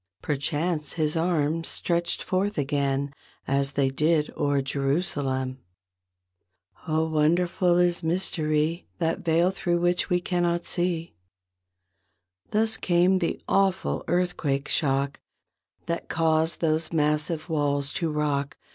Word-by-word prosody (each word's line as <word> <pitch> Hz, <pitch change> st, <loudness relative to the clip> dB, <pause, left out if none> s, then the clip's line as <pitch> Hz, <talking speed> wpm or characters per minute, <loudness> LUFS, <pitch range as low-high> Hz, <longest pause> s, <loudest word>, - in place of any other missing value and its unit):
Perchance 150 Hz, +2 st, -1 dB
His 155 Hz, -1 st, 0 dB
arms 165 Hz, -1 st, 0 dB
stretched 170 Hz, 0 st, -1 dB
forth 195 Hz, +3 st, -1 dB
again 140 Hz, -1 st, 0 dB, 0.3 s
As 140 Hz, +1 st, +1 dB
they 135 Hz, -1 st, +1 dB
did 150 Hz, +2 st, +1 dB
o'er 145 Hz, -1 st, +1 dB
Jerusalem. 135 Hz, -2 st, -1 dB, 1.3 s
Oh, 160 Hz, 0 st, +1 dB
wonderful 170 Hz, +3 st, +2 dB
is 175 Hz, -1 st, +2 dB
mystery! 160 Hz, -1 st, 0 dB
That 165 Hz, -1 st, 0 dB
veil 170 Hz, +2 st, +2 dB
thro' 175 Hz, -2 st, 0 dB
which 175 Hz, +2 st, +1 dB
we 180 Hz, -1 st, +2 dB
cannot 175 Hz, -1 st, 0 dB
see. 175 Hz, -2 st, -1 dB, 1.4 s
Thus 220 Hz, +1 st, +1 dB
came 180 Hz, +1 st, +3 dB
the 170 Hz, -, -1 dB
awful 195 Hz, -1 st, +1 dB
earthquake 165 Hz, -6 st, 0 dB
shock 140 Hz, -2 st, +1 dB, 0.7 s
That 170 Hz, 0 st, -3 dB
caused 160 Hz, 0 st, +1 dB
those 160 Hz, 0 st, +1 dB
massive 150 Hz, +1 st, +1 dB
walls 145 Hz, -3 st, 0 dB
to 165 Hz, -2 st, -1 dB
rock. 145 Hz, -2 st, -1 dB
160 Hz, 110 wpm, -26 LUFS, 145-175 Hz, 1.4 s, came